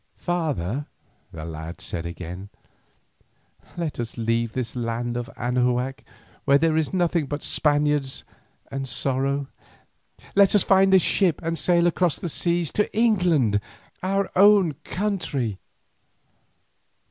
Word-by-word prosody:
"Father," 145 - -2 0.4
the 80 -1 -7
lad 80 +1 -7
said 85 -1 -5
again, 90 +3 -7 1.3
"let 165 -6 -3
us 120 0 -5
leave 115 0 0
this 125 -3 -4
land 120 0 -2
of 120 +1 -4
Anahuac 125 +1 0 0.4
where 140 0 +5
there 160 +1 +2
is 160 -2 0
nothing 175 -4 +1
but 145 +1 -4
Spaniards 145 -2 +1 0.5
and 135 -1 -4
sorrow. 135 +2 0 0.9
Let 200 0 +5
us 205 - +5
find 195 0 +4
a - - +9
ship 180 -2 +2
and 165 +1 -1
sail 170 0 +3
across 175 -1 +2
the 175 - -4
seas 170 0 0
to 210 - 0
England, 175 - +3 0.4
our 195 +1 0
own 200 -3 +6
country." 160 - -2
145 Hz, 125 wpm, -24 LUFS, 120-175 Hz, 1.3 s, a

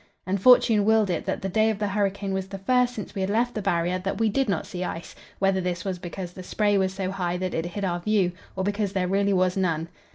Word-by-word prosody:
And 190 0 -1
fortune 230 -3 +6
willed 215 -2 +3
it 170 - -2
that - - -2
the - - 0
day 215 +4 +2
of 220 - -1
the 205 0 -1
hurricane 200 0 -1
was 190 0 -2
the 195 0 -6
first 250 +5 +2
since 210 - -6
we 195 - -3
had 190 - 0
left 235 +4 +1
the 215 - -3
Barrier 180 -1 0
that 190 +1 -3
we 225 -1 +2
did 265 +3 0
not 195 - 0
see 180 -1 -5
ice 170 -1 -5 0.2
whether 195 -1 +2
this 180 +1 -3
was 185 -2 -3
because 175 0 -6
the 185 - -9
spray 205 +2 +1
was 190 -1 +2
so 190 -1 -3
high 180 -2 -2
that 185 0 -3
it 165 +1 -1
hid 195 +3 -4
our 175 -1 -1
view, 195 -1 +1 0.2
or 190 - -1
because 205 0 -1
there 185 -2 0
really 200 +2 +2
was 185 -1 +2
none. 165 -4 0
195 Hz, 265 wpm, -25 LUFS, 180-205 Hz, 0.2 s, fortune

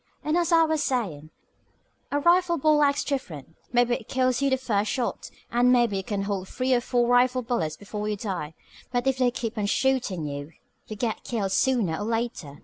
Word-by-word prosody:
"And, 305 +2 0
as 345 0 +1
I 330 -1 +6
was 315 -1 +1
sayin', 175 - -2 0.8
a 290 - +1
rifle 345 +2 +3
ball 300 0 +3
acts 280 -1 +2
different. 165 - -5 0.2
Maybe 245 0 +3
it 225 - -4
kills 255 0 +1
you 275 - +2
the 265 - +2
first 215 -5 -1
shot, 250 -3 -2 0.2
and 245 +1 +4
maybe 240 -5 +3
you 190 - -3
can 200 0 -2
hold 195 -2 -3
three 255 +1 0
or 245 - +3
four 240 -1 +1
rifle 250 +1 +3
bullets 165 -11 -2
before 210 +1 -5
you 210 - -2
die, 185 -7 -4 0.4
but 245 0 0
if 265 -1 +1
they 250 -1 +4
keep 230 -2 -4
on 205 - 0
shootin' 240 - 0
at 145 - -4
you, 145 +2 -7 0.4
you 215 - -6
get 220 0 -3
killed 205 -5 -2
sooner 225 -10 +1
or 205 - -4
later. 225 -11 -3
240 Hz, 210 wpm, -26 LUFS, 200-265 Hz, 0.8 s, I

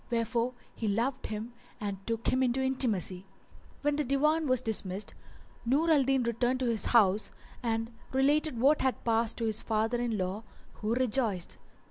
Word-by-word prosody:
Wherefor 235 +1 0 0.2
he 225 - -3
loved 240 +6 -1
him 220 +3 -5 0.3
and 200 -2 -4
took 230 0 -1
him 255 - +1
into 255 0 +1
intimacy. 215 -9 +2 0.6
When 295 0 +1
the 300 - +1
Divan 300 +4 +2
was 255 -1 +3
dismissed 210 -4 -2 0.5
Nur 290 +8 +2
al 300 -3 +5
Din 265 -1 +2
returned 240 +2 0
to - - +1
his 225 - -1
house 210 -3 +4 0.3
and 225 0 -2 0.2
related 280 0 +2
what 285 +5 +4
had 260 -1 0
passed 230 -1 +2
to 230 - -1
his 220 0 0
father 225 +2 0
in 235 -3 -1
law 190 +2 -2 0.3
who 220 +2 -2
rejoiced. 230 -7 0
235 Hz, 165 wpm, -30 LUFS, 220-265 Hz, 0.6 s, al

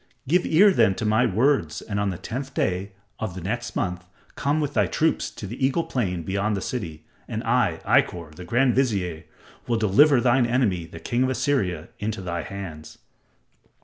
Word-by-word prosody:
Give 175 +5 +2
ear 195 +6 +6
then 95 - +3
to 110 - -3
my 110 +4 +3
words 115 - +1
and 100 -2 -4
on 100 -1 +1
the 90 - -4
tenth 130 +7 -6
day 95 +2 -1 0.3
of 110 -5 -4
the - - -5
next 115 +5 -4
month 90 -1 -2 0.3
come 145 +2 0
with 145 -2 -2
thy - - +2
troops 160 +1 0
to - - -9
the 120 +7 -6
Eagle 135 +5 +2
Plain 90 - -2
beyond 100 +3 -1
the - - -1
city, 85 -9 -5 0.2
and - - -4
I, - - +1
Ikkor, 85 -3 +1
the 90 - -9
grand 120 +7 +2
vizier, 95 -11 0 0.4
will 120 - +1
deliver 120 +7 +5
thine 120 0 +3
enemy, 105 -9 +1
the 80 0 -10
King 120 +7 -1
of 130 - +2
Assyria, 110 - -1
into 105 0 -3
thy 85 -2 -3
hands." 85 -5 -8
110 Hz, 185 wpm, -24 LUFS, 90-130 Hz, 0.4 s, ear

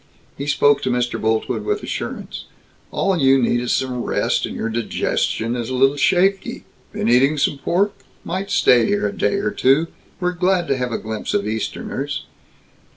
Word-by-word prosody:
He 140 - -5
spoke 145 -1 +3
to 130 - -1
Mr. 125 -1 -1
Boltwood 110 0 0
with 420 0 -2
assurance: - - -5 0.4
"All 195 - 0
you 135 -1 +5
need 120 -1 +2
is 125 - -2
some 130 -2 -1
rest, - - 0
and - - -7
your - - -2
digestion 115 0 -1
is 120 -1 -3
a 130 - -2
little 135 +2 +4
shaky. 190 +6 +1 0.3
Been - - -2
eating 135 +5 +4
some 145 -1 0
pork? 195 +7 +1 0.3
Might 190 +3 -4
stay 120 -3 +4
here 105 0 +1
a 100 - -5
day - - +1
or 205 +1 -1
two. 155 -2 +2 0.3
We're 180 0 0
glad 180 0 +1
to 135 - +2
have 125 -1 -2
a - - -1
glimpse 110 - -4
of 205 - 0
Easterners." 110 0 -3
135 Hz, 180 wpm, -20 LUFS, 120-180 Hz, 0.4 s, you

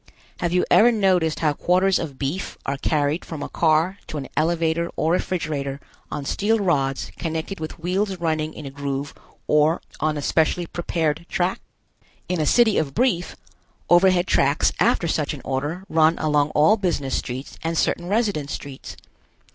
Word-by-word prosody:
Have 175 - -1
you 180 0 +2
ever 240 +3 +7
noticed 185 -7 +1
how 155 -2 +2
quarters 185 +5 +2
of 145 -5 -5
beef 145 +8 -3
are 140 - -1
carried 150 +3 0
from 155 -3 -6
a - - -4
car 165 +4 +2
to 155 - -5
an 140 - -6
elevator 165 +1 +1
or 160 - +1
refrigerator 150 -6 -2 0.3
on 145 -1 -5
steel 215 +9 +1
rods 140 -9 0
connected 165 +3 -3
with 155 - -6
wheels 190 +4 -1
running 155 -2 -1
in 155 - -8
a 135 - -6
groove 140 0 -4 0.3
or 150 +3 +3 0.2
on 155 0 0
a 145 - -4
specially 165 +4 +1
prepared 165 -1 -2
track? 180 +1 -1 0.7
In 180 -3 -1
a 150 - 0
city 235 -4 +4
of 140 -4 -3
Brief, 235 -9 +1 0.6
overhead 180 0 +5
tracks 140 -4 +2
after 170 - +2
such 155 -2 -1
an 135 - -10
order 145 +7 -2
run 160 0 +3
along 150 -1 +1
all 155 +9 +5
business 170 -9 -1
streets 130 +2 -5
and 165 0 -1
certain 175 +3 0
residence 200 -9 0
streets. 140 -2 -8
160 Hz, 165 wpm, -23 LUFS, 145-180 Hz, 0.7 s, ever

